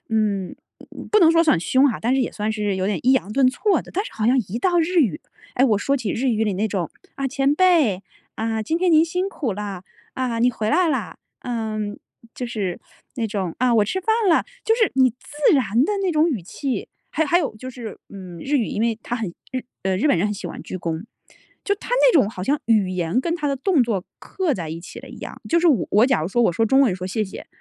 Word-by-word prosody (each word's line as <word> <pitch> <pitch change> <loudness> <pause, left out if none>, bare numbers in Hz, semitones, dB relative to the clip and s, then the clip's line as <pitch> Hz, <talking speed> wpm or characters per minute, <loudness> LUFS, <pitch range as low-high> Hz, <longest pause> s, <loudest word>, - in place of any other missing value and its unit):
嗯， 210 -4 0 0.6
不 430 - +5
能 330 -3 +7
说 330 0 +5
算 310 - +3
凶 260 +11 +3
哈， 235 - -2
但 240 +3 +1
是 270 - +2
也 255 - -1
算 215 +1 -2
是 210 -2 -1
有 190 0 -1
点 200 -3 0
抑 260 - +4
扬 210 -6 0
顿 265 +1 +4
挫 375 +7 +1
的。 - - -13
但 395 +3 -2
是 - - -8
好 215 - -2
像 250 +3 +4
一 215 +6 -3
到 350 +6 +2
日 345 +2 +1
语， 215 - +1 0.3
诶， 255 - +4
我 215 -6 +3
说 275 +6 0
起 230 -6 -3
日 255 +6 -1
语 220 -2 +1
里 210 - 0
那 210 +4 -1
种： 185 -5 -2 0.3
“啊！ 275 - -1
前 275 +2 +1
辈， 305 - +3 0.3
啊， 220 0 -1
今 320 +10 -1
天 365 -1 +2
您 315 0 +6
辛 360 +4 -2
苦 265 - -3
了； 200 -2 -5 0.3
啊， 250 -3 -2
你 245 +2 +4
回 220 -2 -2
来 345 +3 +3
啦！” 225 - -2 0.2
呃， 225 -3 -3 0.6
就 250 - -4
是 205 -7 -3 0.4
那 230 -3 -1
种 195 -5 -3
“啊！ 250 -1 +3
我 210 -2 +4
吃 375 - -2
饭 380 - -25 0.2
了”， 330 - +4 0.2
就 450 - +3
是 450 -3 +2
你 260 -1 +4
自 290 +6 0
然 245 -1 +2
的 420 - 0
那 375 - +1
种 310 -1 +3
语 235 - -2
气。 260 - -4 0.3
还 320 - +2
有 - - 0
还 345 - +4
有 290 -10 -2
就 255 +4 -8
是， 235 -4 -8
嗯， 185 -3 -10
日 285 - 0
语 240 - +1
因 - - -3
为 225 -1 0
它 240 - -3
很 225 -5 -2 0.2
日 255 -1 -3 0.2
呃， 190 -1 0
日 300 - +2
本 280 - +4
人 175 +5 +1
很 210 - -2
喜 200 - -6
欢 - - -7
鞠 185 - -6
躬， 165 +1 -4 0.6
就 405 - +1
他 415 - -11
那 - - +5
种 255 -10 +4
好 185 - -7
像 285 +10 +1
语 215 -4 +3
言 180 +4 0
跟 335 +5 -1
他 300 -3 -3
的 280 - +1
动 275 +2 +2
作 215 -6 -1 0.2
刻 365 -7 -2
在 165 -7 -5
一 165 +1 -6
起 175 - -10
了 - - -12
一 - - -11
样。 - - -8
就 335 0 +3
是 350 - +3
我 265 - +3
我 215 +4 +5
假 260 -10 +1
如 - - -1
说 240 +5 +1
我 225 - +4
说 225 - +1
中 265 +5 +4
文 245 -9 +3
说 185 - -5
谢 215 +4 -1
谢， 200 -2 -7
240 Hz, 280 characters per minute, -22 LUFS, 205-295 Hz, 0.6 s, 能